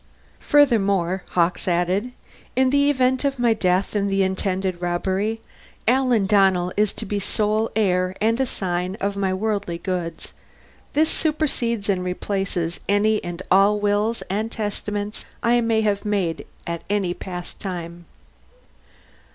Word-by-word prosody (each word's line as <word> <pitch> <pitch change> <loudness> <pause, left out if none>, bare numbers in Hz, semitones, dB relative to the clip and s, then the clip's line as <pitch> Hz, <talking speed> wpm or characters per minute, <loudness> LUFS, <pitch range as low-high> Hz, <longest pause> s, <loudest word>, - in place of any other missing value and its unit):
Furthermore, 200 -10 +3
Hawkes 175 +1 +1
added, 180 +7 +1 0.5
_in 260 0 +4
the 285 +1 +4
event 260 -1 +2
of 275 -1 0
my 240 -2 +3
death 185 -1 0
in 200 -1 +1
the 195 0 +2
intended 190 -1 -1
robbery, 190 +5 -1 0.5
Alan 250 -4 +3
Donnell 190 -3 +3
is 210 0 +2
to - - -7
be 205 +1 -2
sole 215 +2 0
heir 185 -3 +1
and 225 +3 +2
assign 185 -7 -2
of 200 -1 -2
my 195 -1 0
worldly 200 -3 -1
goods. 180 -2 -4 0.6
This 310 +2 +3
supersedes 250 -9 0
and 190 -3 +1
replaces 180 -2 -2
any 210 +1 +2
and 175 +1 -5
all 200 +2 +5
wills 210 +2 0
and 215 +4 -2
testaments 210 -1 -4 0.2
I 240 +1 +4
may 225 -1 +2
have 205 -2 0
made 195 -6 -1 0.2
at 170 -1 -4
any 200 -4 0
past 180 -1 -7
time. 175 -2 -6
200 Hz, 135 wpm, -23 LUFS, 185-220 Hz, 0.6 s, all